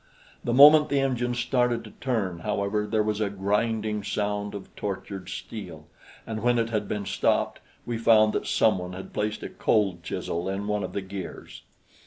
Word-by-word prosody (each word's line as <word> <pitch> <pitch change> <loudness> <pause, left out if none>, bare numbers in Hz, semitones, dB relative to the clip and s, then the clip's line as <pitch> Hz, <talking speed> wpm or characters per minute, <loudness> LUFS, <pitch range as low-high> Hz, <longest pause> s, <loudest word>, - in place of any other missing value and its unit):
The 120 - -1
moment 150 +4 +8
the 140 - +2
engine 125 -2 0
started 120 -1 +1
to - - -11
turn, 105 -9 -2
however, 105 +1 -1
there 110 0 +1
was 105 0 -1
a 105 - +1
grinding 105 +2 -1
sound 105 0 -2
of 100 - -9
tortured 100 -1 -5
steel, 85 -9 -7 0.4
and 110 -1 -4
when 120 +1 +3
it 115 0 0
had 105 -2 -1
been 105 -1 -3
stopped, - - +1 0.3
we 120 -1 -3
found 110 -2 +5
that - - -2
some 105 -4 +3
one 90 0 -6
had 95 +1 -9
placed 105 +1 -2
a - - -4
cold 100 -6 +1
chisel 85 +2 -3
in 100 +1 -3
one 105 -1 -1
of 95 - -5
the 100 - -2
gears. 95 -1 -8
105 Hz, 185 wpm, -26 LUFS, 100-115 Hz, 0.4 s, moment